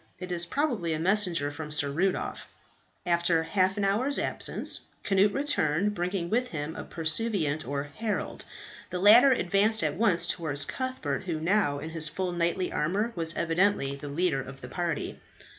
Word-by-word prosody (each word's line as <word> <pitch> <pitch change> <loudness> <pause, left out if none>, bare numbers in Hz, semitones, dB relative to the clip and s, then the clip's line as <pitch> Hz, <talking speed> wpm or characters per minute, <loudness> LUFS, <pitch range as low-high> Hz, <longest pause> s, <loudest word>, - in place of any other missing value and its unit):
It 180 0 -7
is 175 -1 0
probably 235 - -1
a 155 - -2
messenger 175 -5 +2
from 150 +1 -7
Sir 145 -2 +2
Rudolph." 180 +6 -1 0.6
After 170 -1 +2
half 185 +4 +1
an 205 - -1
hour's 240 +9 +2
absence, - - -1 0.2
Cnut 200 +1 +3
returned, 210 - +1
bringing 180 -1 -2
with 245 +7 0
him 155 -5 -5
a - - -6
pursuivant 160 -2 -1
or 140 0 -2
herald. 205 +10 -4 0.5
The 180 - -3
latter 225 +8 +7
advanced 210 0 +2
at 150 -2 +1
once 180 -3 +2
towards 155 -5 -2
Cuthbert, 255 - -3
who, 165 -4 -2
now 170 -3 +1
in 155 +3 -6
his 160 -1 0
full 185 +2 -3
knightly 175 +1 -1
armour, 195 +10 0
was 165 -1 -1
evidently 170 -4 +1
the 145 +1 -8
leader 150 -2 0
of 135 +1 -10
the - - -8
party. 170 -4 -3
175 Hz, 165 wpm, -28 LUFS, 155-205 Hz, 0.6 s, latter